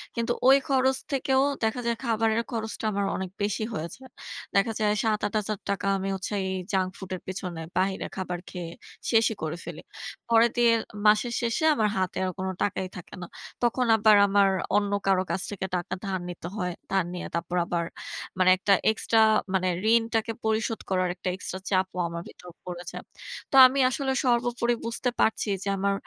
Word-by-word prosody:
কিন্তু 235 0 0
ওই 270 +1 +8
খরচ 265 -1 +3
থেকেও 265 0 +2 0.2
দেখা 220 +3 0
যায় 235 - +1
খাবারের 225 -1 +1
খরচটা 220 -1 -4
আমার 200 0 0
অনেক 190 -1 -4
বেশি 210 +1 -1
হয়ে 165 -3 -3
যায়। 260 -1 -15 0.4
দেখা 220 +3 +3
যায় 210 -1 +2
৳৭-৮০০০ 210 -2 -1
আমি 195 0 -3
হচ্ছে 190 +2 -5 0.2
এই 190 - -2 0.2
জাঙ্ক 185 -1 +2
ফুডের 185 -1 -5
পিছনে 180 -3 -5 0.2
বাহিরে 190 +1 0
খাবার 180 -2 -3
খেয়ে 175 -2 -6 0.4
শেষই 225 -1 +3
করে 160 +2 -3
ফেলি। - - -7 0.5
পরে 230 0 +6
দিয়ে 240 -1 +5 0.4
মাসের 215 +3 +4
শেষে 235 +5 -1
আমার 215 -5 +2
হাতে 185 -1 -1
আর 185 - -1
কোনো 190 0 -1
টাকাই 190 -2 -1
থাকে 180 - -11
না। 175 - -6 0.4
তখন 240 +1 +2
আবার 215 0 +6
আমার 200 0 +4 0.3
অন্য 205 -1 0 0.2
কারো 190 -1 +3
কাছ 185 - -1
থেকে 195 -2 -4
টাকা 180 +1 -3
ধার 190 -1 -2
নিতে 170 -1 -7
হয়। 180 -3 -2 0.2
ধার 190 -3 +2
নিয়ে 180 - -5
তারপর 175 +2 -3
আবার 170 -1 -1 0.5
মানে 185 0 +5
একটা 195 +2 +3 0.2
এক্সট্রা 225 +1 +1 0.4
মানে 185 0 +1 0.3
ঋণটাকে 225 -1 +1
পরিশোধ 220 +1 0
করার 185 -1 +1
একটা 185 0 -3
এক্সট্রা 185 0 -5
চাপও 185 -1 0
আমার 170 0 -5
ভিতর 180 - -13 0.2
পড়ে 175 -1 -6
যায়। - - -7 0.5
তো - - 0
আমি 275 +2 -2
আসলে 265 +1 -1
সর্বোপরি 240 0 +1
বুঝতে 235 +2 0
পারছি 220 -1 +2
যে - - -6
আমার 200 +1 +1
205 Hz, 175 wpm, -26 LUFS, 185-230 Hz, 0.5 s, ওই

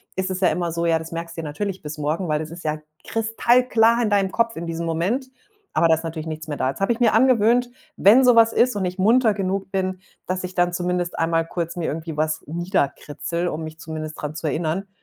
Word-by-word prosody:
ist 190 0 -1
es 185 - -3
ja 185 - +5
immer 175 -1 -1
so, 170 +1 -2
ja, 165 - +3
das 160 0 -8
merkst 165 0 -6
du - - -2
dir 160 - -6
natürlich 195 +6 -4
bis 150 +1 -6
morgen, 155 +5 -1
weil 150 -1 0
das 155 0 -5
ist 170 +1 -9
ja 155 0 -2 0.3
kristallklar 230 +1 +3
in 225 - +1
deinem 200 -2 +2
Kopf 230 +1 0
in 170 - -4
diesem 165 0 -3
Moment, 185 +11 -1 0.5
aber 170 - +4
da 160 - +5
ist 160 +1 -1
natürlich 160 -1 -5
nichts 160 0 -6
mehr 145 - -3
da. 130 - 0
Jetzt 140 - -12
habe 195 - +2
ich 235 - -1
mir 235 -3 +4
angewöhnt, 240 0 +4 0.3
wenn 235 +7 +6
so 245 -1 +6
was 225 0 +6
ist 245 +1 +2
und 200 - -1
ich 180 0 -3
munter 220 +3 +4
genug 195 0 -2
bin, 185 -1 -2 0.2
dass 185 0 -3
ich 185 0 -6
dann 175 0 +2
zumindest 175 0 -2
einmal 165 0 +1
kurz 170 0 -4
mir 170 - -2
irgendwie 160 0 -4
wasnieder 155 +1 0
kritzel, 170 +4 -3
um 160 -2 -3
mich 155 0 -8
zumindest 155 -1 -6
dran 150 0 -4
zu 155 +1 -3
erinnern. 160 +6 -1
175 Hz, 245 wpm, -22 LUFS, 160-205 Hz, 0.5 s, wenn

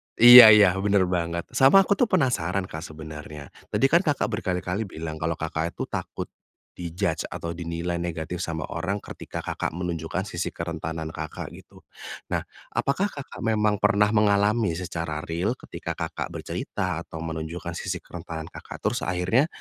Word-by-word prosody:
Iya 120 -1 +12
iya 105 -3 +7
bener 100 -1 +3
banget 85 -1 -1
sama 135 +10 +6
aku - - -7
tuh 245 - +4
penasaran, 115 - +1
Kak, 80 - -5
sebenarnya 75 -2 -9 0.2
tadi 135 - +2
kan 170 - +6
Kakak 145 - +1
berkali-kali 90 0 -2
bilang 80 -2 -6
kalau 80 0 -1
Kakak 80 +1 -3
itu - - -3
takut, - - -5 0.5
di-judge 85 0 -2
atau 85 - -4
dinilai 85 0 -3
negatif 85 0 -4
sama 80 -2 -3
orang 100 +3 -2
ketika - - -7
Kakak - - -3
menunjukkan 85 +1 -3
sisi 85 -1 -3
kerentanan 80 -1 -4
Kakak 80 -2 -6
gitu, - - -15 0.5
nah - - 0 0.3
apakah 180 +9 0
Kakak 140 -2 -9
memang 105 -2 +2
pernah 105 0 +4
mengalami 105 0 +3
secara 85 -3 -4
real 85 +6 -1
ketika - - -7
Kakak - - -4
bercerita - - -3
atau 80 - -9
menunjukkan 80 +1 -5
sisi 90 +1 -3
kerentanan 80 -2 -7
Kakak - - -10
terus 120 +3 -1
akhirnya 95 - +2
90 Hz, 155 wpm, -25 LUFS, 80-105 Hz, 0.5 s, Iya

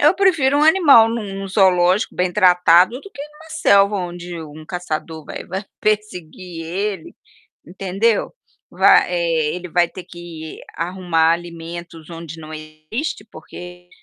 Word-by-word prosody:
Eu 300 +5 +5
prefiro 310 -8 +3
um - - +2
animal 305 -9 +6
num 210 -4 -4
num 195 - -6
zoológico 185 0 +2
bem 180 0 -1
tratado 180 +3 +4
do 400 - -13
que - - -11
em 300 0 -12
uma 320 +1 -15
selva 200 -10 +3
onde 175 -2 -6
um 155 0 -11
caçador 160 -3 -5
vai - - -8
vai 190 +3 -5 0.2
perseguir 180 -5 -3
ele, 190 +1 -4 0.5
entendeu? 195 +5 -1 0.4
Vai, - - +5
eh, 165 -3 0
ele 180 0 -7
vai 175 0 +2
ter 185 - -10
que 170 -3 -10 0.2
arrumar 170 -2 +1
alimentos 170 -1 -7
onde 165 -1 -9
não 155 0 -10
existe, 155 - -6
porque 180 +2 -12
180 Hz, 145 wpm, -19 LUFS, 165-210 Hz, 0.5 s, animal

